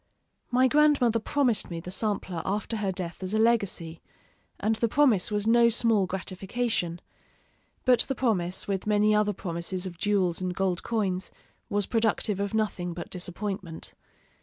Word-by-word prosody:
My 255 +1 +4
grandmother 280 -5 +4
promised 245 0 +1
me 170 -1 -4
the 180 +2 -8
sampler 190 -4 -1
after 210 +3 -2
her 200 -2 -1
death 180 -2 -5
as 190 +3 -2
a - - +3
legacy, 200 -8 +1 0.6
and 220 +1 +1
the 230 - +1
promise 235 -6 +3
was 210 -1 -1
no 235 +1 +5
small 225 -4 +2
gratification; 190 -1 -2 0.9
but 250 -2 +5
the 270 - +1
promise, 190 -8 0
with 195 0 -2
many 210 0 +3
other 210 0 +3
promises 180 -1 -4
of 175 -2 -7
jewels 185 -4 +1
and 180 -1 -2
gold 190 -2 0
coins, 195 -5 -1 0.4
was 205 -1 0
productive 220 -2 0
of 200 +1 -2
nothing 180 -5 -1
but 170 - -7
disappointment. 180 -1 -5
205 Hz, 155 wpm, -27 LUFS, 180-225 Hz, 0.9 s, no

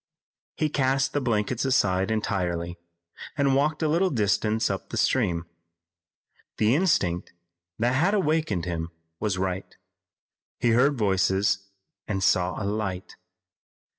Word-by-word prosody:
He 155 - +1
cast 135 -2 +1
the 145 - 0
blankets 115 0 0
aside 95 -8 +2
entirely 90 -6 -1 0.6
and 140 -2 +3
walked 150 +4 +1
a - - +2
little 170 +5 +2
distance 105 - +1
up - - -4
the - - -4
stream. 85 -1 +1 1.1
The 110 +2 +3
instinct 115 - +1 0.4
that 120 +2 +1
had 175 +10 +2
awakened 155 - 0
him 85 -2 -3 0.3
was 105 -4 -1
right. 95 0 -3 0.8
He 120 - +2
heard 130 +5 +3
voices 100 -1 +1 0.4
and 95 -2 -2
saw 90 0 +2
a 100 - -3
light. 100 -3 -3
105 Hz, 125 wpm, -26 LUFS, 95-135 Hz, 1.1 s, and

